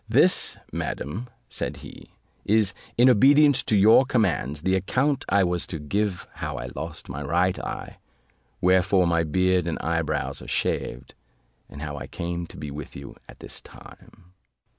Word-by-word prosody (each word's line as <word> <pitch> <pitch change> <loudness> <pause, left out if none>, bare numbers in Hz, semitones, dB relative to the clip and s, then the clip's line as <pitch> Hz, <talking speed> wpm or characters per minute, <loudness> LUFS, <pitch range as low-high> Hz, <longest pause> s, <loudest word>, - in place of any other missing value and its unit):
"This, - - +3
madam," 105 - -4 0.2
said - - -4
he, - - -12 0.3
"is, 105 -2 +2 0.2
in 120 +2 +6
obedience 140 +4 +6
to 105 - +1
your 110 +6 +7
commands, 90 - 0
the 95 - +1
account 130 +9 +1
I 100 -1 +4
was 90 -1 0
to 85 - -4
give 95 +5 -2
how - - -3
I 65 0 -6
lost 80 0 -7
my 70 +1 -6
right 90 +6 +1
eye, - - -6 0.6
wherefore 95 +1 +4
my 85 -1 +2
beard 90 +2 +1
and 85 - -2
eye 85 0 0
brows 80 - -3
are - - -10
shaved, 60 +2 -2 0.6
and 75 +1 -9
how 75 -1 -5
I - - -7
came 85 0 -4
to - - -13
be 75 0 -6
with 75 0 -8
you 70 0 -9
at - - -14
this - - -7
time." 90 - -16
90 Hz, 165 wpm, -25 LUFS, 75-105 Hz, 0.6 s, your